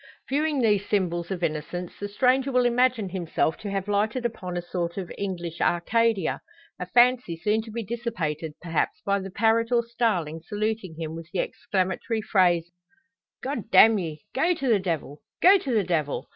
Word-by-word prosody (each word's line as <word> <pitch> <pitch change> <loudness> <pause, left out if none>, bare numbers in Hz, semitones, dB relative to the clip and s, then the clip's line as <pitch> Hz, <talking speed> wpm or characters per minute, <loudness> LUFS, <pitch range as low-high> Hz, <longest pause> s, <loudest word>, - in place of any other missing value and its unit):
Viewing 295 0 0
these 205 -3 +2
symbols 175 -4 0
of 185 -3 -4
innocence, 170 +3 -3
the 205 - -4
stranger 255 +5 +2
will 250 -1 +3
imagine 240 -4 +2
himself 170 -3 -1
to 210 - -6
have 195 0 -2
lighted 215 +4 0
upon 185 -6 -3
a - - -1
sort 175 0 -3
of 185 -3 -5
English 175 -4 -4
Arcadia 220 +4 +1 0.4
a - - -4
fancy 245 -8 +3
soon 210 +6 +1
to 225 - -11
be 230 +1 -4
dissipated 180 -9 -3
perhaps 165 -2 -1
by 200 0 +2
the 195 0 -6
parrot 225 +4 +2
or 235 -1 +3
starling 205 -10 -1
saluting 210 -1 -3
him 160 -1 -5
with 165 0 -9
the - - -4
exclamatory 190 +6 -1
phrases, 175 -5 +2 0.7
`God 260 -6 -4
damn 220 -2 +7
ye! 160 -4 -5
go 335 +7 +2
to 275 - -3
the 220 -3 +4
devil! 160 -5 -3 0.2
go 385 +2 +7
to 275 - -4
the 220 -4 +2
devil!' 160 -5 -1
200 Hz, 175 wpm, -26 LUFS, 175-235 Hz, 0.7 s, damn